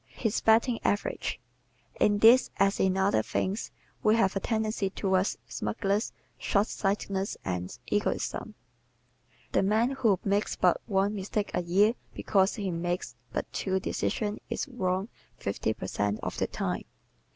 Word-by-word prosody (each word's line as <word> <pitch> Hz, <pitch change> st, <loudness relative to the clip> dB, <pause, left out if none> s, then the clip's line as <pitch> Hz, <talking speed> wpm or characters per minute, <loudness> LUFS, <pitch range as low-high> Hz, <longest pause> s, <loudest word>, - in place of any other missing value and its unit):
His 220 Hz, -3 st, -2 dB
"Batting 230 Hz, +2 st, +4 dB
Average" 205 Hz, -, -1 dB, 0.6 s
¶ -, -, -21 dB
In 205 Hz, -1 st, +4 dB
this, 230 Hz, +5 st, +7 dB
as 195 Hz, 0 st, +3 dB
in 190 Hz, 0 st, +2 dB
other 190 Hz, -, +3 dB
things, 190 Hz, -, -2 dB, 0.3 s
we 215 Hz, +1 st, +4 dB
have 195 Hz, -4 st, +2 dB
a -, -, +1 dB
tendency 215 Hz, -2 st, -1 dB
toward 190 Hz, 0 st, +1 dB, 0.2 s
smugness, 195 Hz, -, -1 dB, 0.3 s
shortsightedness 200 Hz, -1 st, 0 dB
and 90 Hz, +4 st, -3 dB
egotism. 205 Hz, 0 st, -1 dB, 1.0 s
The -, -, +3 dB
man 220 Hz, +6 st, +2 dB
who 225 Hz, -8 st, +2 dB
makes 200 Hz, +1 st, +1 dB
but 180 Hz, -2 st, +3 dB
one 200 Hz, -1 st, +2 dB
mistake 205 Hz, +1 st, -2 dB
a 180 Hz, -, +1 dB
year 195 Hz, +6 st, +3 dB, 0.2 s
because 195 Hz, -1 st, +2 dB
he 200 Hz, -5 st, -2 dB
makes 175 Hz, +1 st, -2 dB, 0.2 s
but -, -, -4 dB
two 190 Hz, -1 st, 0 dB
decisions 210 Hz, +2 st, -2 dB
is -, -, -2 dB
wrong 190 Hz, -6 st, -1 dB, 0.3 s
fifty 100 Hz, +2 st, -1 dB
per 110 Hz, -, -5 dB
cent 105 Hz, +2 st, -1 dB
of -, -, -3 dB
the -, -, +1 dB
time. -, -, -3 dB
195 Hz, 145 wpm, -29 LUFS, 185-215 Hz, 1.0 s, this